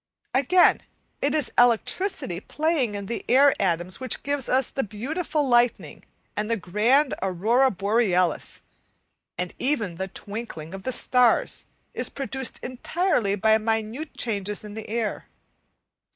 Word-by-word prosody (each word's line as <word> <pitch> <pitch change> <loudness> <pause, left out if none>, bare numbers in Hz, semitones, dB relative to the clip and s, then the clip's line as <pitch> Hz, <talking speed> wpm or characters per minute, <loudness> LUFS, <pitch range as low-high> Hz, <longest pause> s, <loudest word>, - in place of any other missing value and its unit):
Again, 315 +8 +4 0.4
it - - +1
is 295 -5 0
electricity 245 - +2
playing 295 - -1
in 200 -1 -4
the 235 +4 -4
air 275 +3 +6
atoms 175 -1 -1
which 260 -1 0
gives 285 -2 -1
us 260 +1 +2
the 270 - -1
beautiful 285 - -2
lightning 240 -1 +1 0.3
and 210 +1 -2
the 230 - +1
grand 230 +10 +2
aurora 215 +8 +2
borealis, 195 -4 0 0.7
and 180 0 -3
even 225 - -1
the 190 - -3
twinkling 195 -5 -7
of 195 - -7
the 260 - -3
starts 250 -1 +2 0.3
is - - 0
produced 265 -2 -4
entirely 255 - 0
by 220 +2 +3
minute 225 +7 -3
changes 205 -3 -2
in 210 -1 -9
the 220 0 -8
air. 225 -1 -3
230 Hz, 135 wpm, -25 LUFS, 200-265 Hz, 0.7 s, air